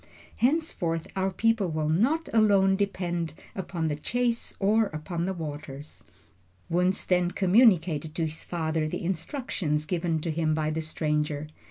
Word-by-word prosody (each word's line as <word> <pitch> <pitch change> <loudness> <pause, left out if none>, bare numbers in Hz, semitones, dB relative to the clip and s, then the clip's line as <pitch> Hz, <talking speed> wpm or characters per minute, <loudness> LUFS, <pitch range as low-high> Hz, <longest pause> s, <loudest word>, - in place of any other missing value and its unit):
Henceforth 230 - 0
our 190 0 +1
people 215 0 +1
will 155 -1 -1
not 250 - +2
alone 200 -3 +5
depend 175 -5 -2 0.2
upon 175 -4 -3
the 150 - 0
chase 235 +9 -1
or 215 +2 +3
upon 170 +1 -4
the 190 - -1
waters." 150 -3 -7 0.7
Wunzh 180 +3 +1
then 180 -1 +2
communicated 180 - +3
to 165 - 0
his 155 0 -4
father 160 -2 -1
the 155 - -4
instructions 175 - -2
given 165 -1 0
to 165 - -2
him 155 -1 +1
by 155 0 0
the 160 +1 -2
stranger. 150 -1 -1
170 Hz, 145 wpm, -27 LUFS, 155-195 Hz, 0.7 s, alone